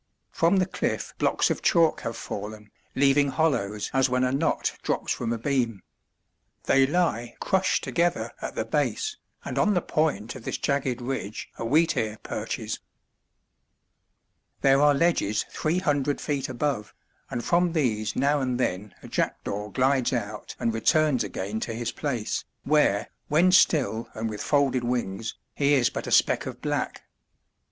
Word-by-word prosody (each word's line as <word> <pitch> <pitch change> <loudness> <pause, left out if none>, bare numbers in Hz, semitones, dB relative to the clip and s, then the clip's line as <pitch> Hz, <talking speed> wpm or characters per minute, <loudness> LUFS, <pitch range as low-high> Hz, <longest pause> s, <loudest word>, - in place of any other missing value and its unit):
From 170 +4 +3
the 185 - +3
cliff - - -3
blocks - - +2
of - - -2
chalk 165 -2 +3
have 115 - -4
fallen, 105 +1 -7 0.2
leaving 140 +1 +4
hollows 125 -9 0
as 135 -1 +3
when 125 0 +1
a 125 - +2
knot 140 +5 0
drops - - -1
from 115 -1 -3
a 115 - 0
beam. 120 -5 -1 0.8
They 135 0 +4
lie 130 -8 0
crushed 190 -1 +1
together 175 0 0
at - - -5
the - - -1
base, 430 0 -1 0.3
and - - -2
on 210 -1 +3
the 180 - +2
point 150 -7 0
of - - -10
this - - -3
jagged 135 -3 -1
ridge 120 -5 -4
a - - -3
wheatear 115 -5 +2
perches. - - -4 1.8
There 135 0 +5
are 145 -1 +5
ledges 140 -10 +1
three 160 +3 0
hundred 145 -5 0
feet 145 -3 -2
above, 130 -4 -2 0.3
and 120 - -4
from 175 0 +2
these 110 -9 0
now 145 +2 +2
and 130 -1 -1
then 100 -4 -2
a - - -9
jackdaw 105 +1 -2
glides 130 0 +2
out 105 -3 -4
and 115 - 0
returns 140 +2 +3
again 100 +1 -4
to 115 - -4
his 115 0 -2
place, 125 -8 -2 0.2
where, 145 -9 +3 0.2
when 170 +5 +4
still 140 -10 +3
and 110 0 -2
with 105 - -5
folded 140 -4 +2
wings, 115 -3 -2 0.2
he 145 0 +3
is 125 -3 +3
but - - -5
a - - -4
speck - - +3
of - - -7
black. - - -2
130 Hz, 160 wpm, -26 LUFS, 115-150 Hz, 1.8 s, There